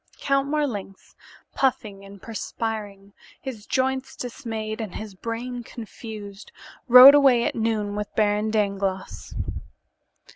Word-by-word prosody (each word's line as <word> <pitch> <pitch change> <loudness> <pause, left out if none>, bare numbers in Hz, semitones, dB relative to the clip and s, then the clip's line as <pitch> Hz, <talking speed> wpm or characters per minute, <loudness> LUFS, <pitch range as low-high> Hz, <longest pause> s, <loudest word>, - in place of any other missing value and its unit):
Count 275 0 +1
Marlanx, 245 -11 -3 0.4
puffing 215 -7 -1
and 195 -1 -13
perspiring, 210 -3 -5 0.3
his 230 -6 -8
joints 265 0 -1
dismayed 225 -3 -5
and 215 -5 -6
his 215 -2 -7
brain 235 +4 -5
confused, 215 -3 -9 0.4
rode 255 +2 +11
away 270 -5 +5
at - - 0
noon 220 -2 -1
with 210 -1 -4
Baron 210 0 +1
Dangloss. 200 -3 -2
220 Hz, 110 wpm, -24 LUFS, 205-250 Hz, 0.4 s, rode